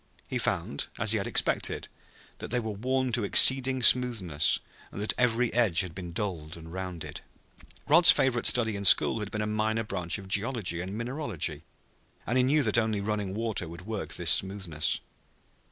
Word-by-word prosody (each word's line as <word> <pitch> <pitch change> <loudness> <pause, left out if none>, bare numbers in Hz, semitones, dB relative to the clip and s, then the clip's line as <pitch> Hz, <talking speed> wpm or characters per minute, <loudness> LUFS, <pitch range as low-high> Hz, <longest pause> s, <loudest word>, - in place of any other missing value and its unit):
He - - -3
found, 70 - -2
as - - +1
he - - +1
had - - -4
expected, - - -1 0.5
that - - -7
they 125 - 0
were 110 -2 -4
worn 130 +5 -2
to 115 -1 -1
exceeding 130 +4 +5
smoothness, 105 - +3 0.3
and - - -8
that 105 - -1
every 125 -1 0
edge 110 -8 +2
had 90 -4 -7
been 90 -1 -8
dulled 85 -4 -5
and 80 0 -12
rounded. 90 -3 -7 0.7
Rod's 170 +4 +7
favorite 120 -3 +1
study 110 -3 +2
in 100 - -5
school 105 +3 +5
had 105 -1 -5
been 105 0 -3
a - - -2
minor 110 +1 -1
branch 90 -4 -3
of 95 -2 -11
geology 100 -4 -1
and 95 +3 -6
mineralogy, 115 - -4 0.6
and 120 - -2
he 130 - +3
knew 145 +3 +2
that 110 -1 +2
only 110 -2 -1
running 100 -1 -3
water 110 -5 -3
could 85 +2 -11
work 110 -2 -5
this - - +3
smoothness. 95 -6 -1
105 Hz, 180 wpm, -27 LUFS, 90-120 Hz, 0.7 s, Rod's